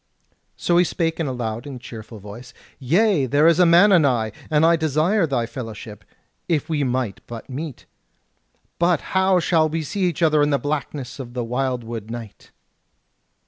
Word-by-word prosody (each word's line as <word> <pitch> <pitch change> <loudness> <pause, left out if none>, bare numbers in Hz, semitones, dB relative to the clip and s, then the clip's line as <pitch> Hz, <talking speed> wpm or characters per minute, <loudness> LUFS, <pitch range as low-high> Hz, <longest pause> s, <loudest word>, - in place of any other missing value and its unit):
So 175 - +1
he 175 - +6
spake 165 -1 -2
in 160 - -1
a - - -2
loud 120 +1 -4
and 135 -3 -7
cheerful 110 -2 -10
voice: 105 +5 -11 0.2
"Yea, 165 - +2
there 145 +4 +3
is 165 +1 +5
a 180 - +6
man 175 +5 +6
anigh, 130 - +3 0.2
and 155 0 +3
I 170 +1 +5
desire 160 +5 +1
thy 125 -5 0
fellowship, 115 -5 -8 0.5
if 155 -5 0
we 155 -3 0
might 125 -5 -2
but 115 -1 -8
meet. 145 0 -6 0.9
But 170 -3 +2
how 190 -1 +3
shall 160 -2 +2
we 160 +1 -2
see 195 +5 -2
each 170 -2 -1
other 155 -2 +4
in 145 - +3
the 140 - +2
blackness 145 -2 -4
of 120 -2 -8
the 125 - -1
wildwood 120 -3 -3
night?" 115 -3 -9
145 Hz, 175 wpm, -22 LUFS, 120-165 Hz, 0.9 s, he